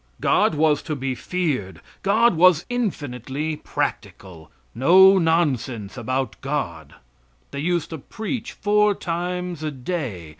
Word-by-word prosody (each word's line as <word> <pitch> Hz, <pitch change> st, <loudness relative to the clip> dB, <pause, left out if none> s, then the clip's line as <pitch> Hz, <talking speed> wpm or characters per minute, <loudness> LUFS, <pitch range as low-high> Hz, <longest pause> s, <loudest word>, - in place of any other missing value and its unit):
God -, -, +2 dB
was 150 Hz, -1 st, +2 dB
to 155 Hz, -, -4 dB
be 135 Hz, -1 st, -3 dB
feared; 130 Hz, -, -3 dB, 0.2 s
God 220 Hz, +1 st, +3 dB
was 175 Hz, -1 st, +5 dB
infinitely 150 Hz, -, -3 dB
practical; 85 Hz, -, -5 dB, 0.2 s
no 190 Hz, +9 st, +6 dB
nonsense 130 Hz, -, 0 dB
about 130 Hz, 0 st, -3 dB
God. 85 Hz, -, -4 dB, 0.6 s
They 140 Hz, -, -5 dB
used 170 Hz, +1 st, -1 dB
to 160 Hz, -, -5 dB
preach 220 Hz, -, -5 dB
four 210 Hz, 0 st, +2 dB
times 180 Hz, -1 st, -4 dB
a 155 Hz, -, -2 dB
day. 130 Hz, -, -5 dB
155 Hz, 120 wpm, -22 LUFS, 130-180 Hz, 0.6 s, no